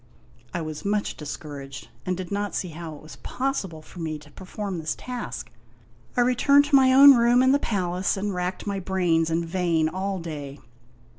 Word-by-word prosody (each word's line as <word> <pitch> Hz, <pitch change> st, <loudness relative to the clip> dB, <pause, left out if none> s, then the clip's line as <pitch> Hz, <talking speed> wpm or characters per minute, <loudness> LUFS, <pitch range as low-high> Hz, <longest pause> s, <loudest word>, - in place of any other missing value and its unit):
I 170 Hz, -, -3 dB
was 155 Hz, -1 st, -6 dB
much 205 Hz, 0 st, -1 dB
discouraged, 140 Hz, -2 st, -8 dB, 0.2 s
and 185 Hz, -1 st, 0 dB
did 185 Hz, 0 st, -6 dB
not 205 Hz, 0 st, -2 dB
see 180 Hz, -, -2 dB
how 160 Hz, -1 st, -7 dB
it 145 Hz, -, -14 dB
was 155 Hz, -, -12 dB
possible 195 Hz, -, -3 dB
for 180 Hz, -, -13 dB
me 160 Hz, -2 st, -3 dB
to 150 Hz, 0 st, -16 dB
perform 190 Hz, +2 st, -5 dB
this 160 Hz, -1 st, -2 dB
task. 250 Hz, -1 st, -6 dB, 0.7 s
I -, -, +5 dB
returned 265 Hz, +4 st, +4 dB
to 290 Hz, -1 st, +3 dB
my 260 Hz, -1 st, +6 dB
own 275 Hz, +2 st, +10 dB
room 240 Hz, +1 st, +4 dB
in 260 Hz, -, +5 dB
the 280 Hz, -, +4 dB
palace 185 Hz, -4 st, -1 dB
and 200 Hz, +1 st, -2 dB
racked 180 Hz, +1 st, -3 dB
my 200 Hz, -1 st, -2 dB
brains 175 Hz, -4 st, +1 dB
in 165 Hz, +1 st, 0 dB
vain 165 Hz, -2 st, +1 dB
all 190 Hz, +4 st, -3 dB
day. 150 Hz, -5 st, -6 dB
185 Hz, 190 wpm, -25 LUFS, 160-210 Hz, 0.7 s, own